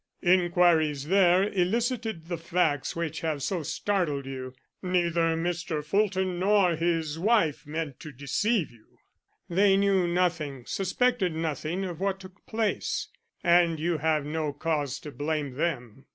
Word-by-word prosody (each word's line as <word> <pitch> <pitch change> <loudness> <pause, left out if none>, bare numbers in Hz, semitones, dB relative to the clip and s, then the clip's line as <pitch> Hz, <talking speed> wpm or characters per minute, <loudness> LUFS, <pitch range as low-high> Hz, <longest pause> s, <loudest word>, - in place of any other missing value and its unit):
"Inquiries 175 -5 +3
there 185 -1 +5
elicited 220 0 -1
the 170 -1 -4
facts 165 -4 0
which 165 -1 -3
have 155 -4 -2
so 180 +2 -1
startled 155 -3 -1
you. 130 -1 -7 0.3
Neither 170 -3 +1
Mr. 165 -2 -2
Fulton 190 -1 0
nor 190 -2 +3
his 165 -2 -1
wife 190 -8 +2
meant 155 -3 -4
to 150 - -9
deceive 155 - 0
you. 115 -2 -23 0.5
They 195 +2 +4
knew 195 -2 +2
nothing, 165 -7 -1
suspected 195 - 0
nothing 160 +3 -2
of 175 -3 -6
what 195 0 -1
took 190 +1 -14
place, 220 -1 -1 0.3
and 170 -2 +4
you 165 0 0
have 155 -1 +1
no 155 -1 -2
cause 145 -2 -2
to 150 - -8
blame 145 0 -2
them. 135 -5 -3
170 Hz, 140 wpm, -27 LUFS, 150-185 Hz, 0.5 s, there